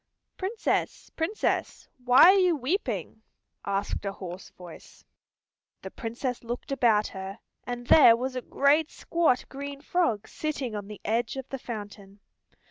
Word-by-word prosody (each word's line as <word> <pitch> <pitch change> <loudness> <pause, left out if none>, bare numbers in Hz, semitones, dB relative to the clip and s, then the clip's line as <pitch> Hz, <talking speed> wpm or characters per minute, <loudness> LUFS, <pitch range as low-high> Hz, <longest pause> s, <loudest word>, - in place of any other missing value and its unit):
"Princess, 405 +4 -2
Princess, 335 +7 -1 0.2
why 250 +1 +7
are 395 - +4
you 360 -3 +3
weeping?" 250 - -3 0.4
asked 200 0 -2
a 200 -1 -3
hoarse 185 -1 -8
voice. 175 -2 -14 0.8
The - - -7
Princess 240 +2 -4
looked 240 +3 -6
about 225 -6 +3
her, 190 +1 -7 0.3
and 245 0 -5
there 240 -3 +8
was 255 +2 -4
a 255 - -2
great 295 +5 +2
squat 330 -7 0
green 280 +1 -7
frog 285 - 0
sitting 285 -6 -4
on 205 -1 -5
the 210 0 -10
edge 230 +5 0
of 265 -1 -6
the 270 - -5
fountain. 205 -4 -8
245 Hz, 140 wpm, -27 LUFS, 210-280 Hz, 0.8 s, there